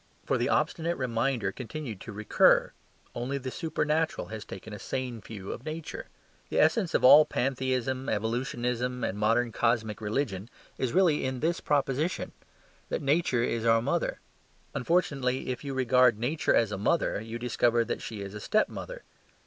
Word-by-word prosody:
For - - +1
the - - +1
obstinate 170 +1 0
reminder 120 -4 0
continued 125 -3 -6
to 115 - -8
recur: 105 +1 +3 0.4
only 125 +4 -3
the 130 -1 -5
supernatural 160 +1 -1
has 110 -1 -6
taken 100 +3 -9
a 105 - -7
sane 125 -4 -4
view 100 -3 -8
of 120 - -7
Nature. 160 - -6 0.4
The - - 0
essence 195 -8 +3
of - - +2
all 145 +4 +10
pantheism, 130 -1 -1
evolutionism, 120 +2 -1
and 95 - -1
modern 115 +3 +2
cosmic 110 -2 0
religion 105 -2 -2 0.3
is 130 -3 0
really 175 -4 +3
in 130 -1 -2
this 165 +4 0
proposition: 145 +3 0 0.6
that - - -2
Nature 140 -4 +2
is 115 -2 -1
our 115 0 +4
mother. 140 +8 -1 0.5
Unfortunately, 135 -4 0
if 125 +2 -3
you 140 -2 -4
regard 125 -2 +4
Nature 135 +8 +1
as 115 -3 +2
a 100 - -3
mother, 110 -1 +1
you 115 +1 -6
discover 120 -1 +1
that - - -3
she 105 -3 -6
is 100 0 -7
a 105 - -6
step 215 - +1
mother. - - -8
125 Hz, 165 wpm, -28 LUFS, 115-140 Hz, 0.6 s, all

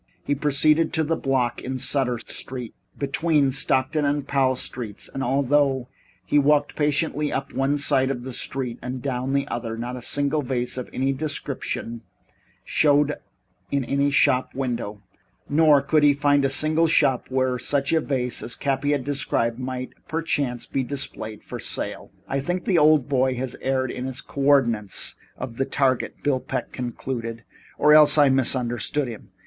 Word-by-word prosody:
He 145 - 0
proceeded 150 +2 +2
to 160 - +1
the 165 +2 0
block 130 -4 0
in 130 +1 -4
Sutter 130 -1 0
Street 125 +1 -7 0.2
between 145 0 +1
Stockton 135 +2 0
and 145 0 0
Powell 135 -2 +2
Streets, 115 -4 -6
and 135 - -3
although 135 0 +1 0.4
he 145 +11 +3
walked 145 +1 +2
patiently 150 0 0
up 135 0 -3
one 135 +2 +1
side 135 -2 +2
of 125 -3 -3
the 130 0 -6
street 125 -1 -3
and 125 +1 -4
down 130 -1 -2
the 140 0 +1
other, 115 -3 -4
not 120 +2 -4
a 125 - -7
single 145 +4 0
vase 125 -2 -2
of 125 -1 -5
any 135 +1 0
description 135 -5 -4 0.6
showed 145 0 +3 0.6
in 140 -2 0
any 140 +3 +1
shop 130 -2 +2
window, 115 -6 -3 0.4
nor 150 -2 +5
could 155 +2 +3
he 145 -1 +6
find 145 0 +2
a - - +2
single 155 +4 +2
shop 130 -5 +2
where 130 -1 0
such 140 +3 0
a 160 - +3
vase 125 -4 -1
as 120 - -4
Cappy 140 +1 0
had 140 -3 -1
described 125 -4 -1
might, 130 0 -5
perchance, 145 -6 -2
be 135 - -2
displayed 115 -5 -5
for - - -7
sale. - - -4 0.2
"I 135 - -1
think 175 +6 -2
the 180 -4 +3
old 150 -3 +5
boy 130 -2 +1
has 125 0 -3
erred 130 -1 0
in 125 +1 -4
the 130 0 -4
co 140 - -5
ordinates 120 -8 +2 0.2
of 125 -2 -6
the 135 - +1
target," 135 -2 0
Bill 140 -3 +2
Peck - - -4
concluded, 120 -2 -5 0.3
"or 150 +1 +5
else 150 0 +7
I 145 -2 +6
misunderstood 130 +1 +1
him. 115 -3 -9
135 Hz, 170 wpm, -24 LUFS, 125-145 Hz, 0.6 s, else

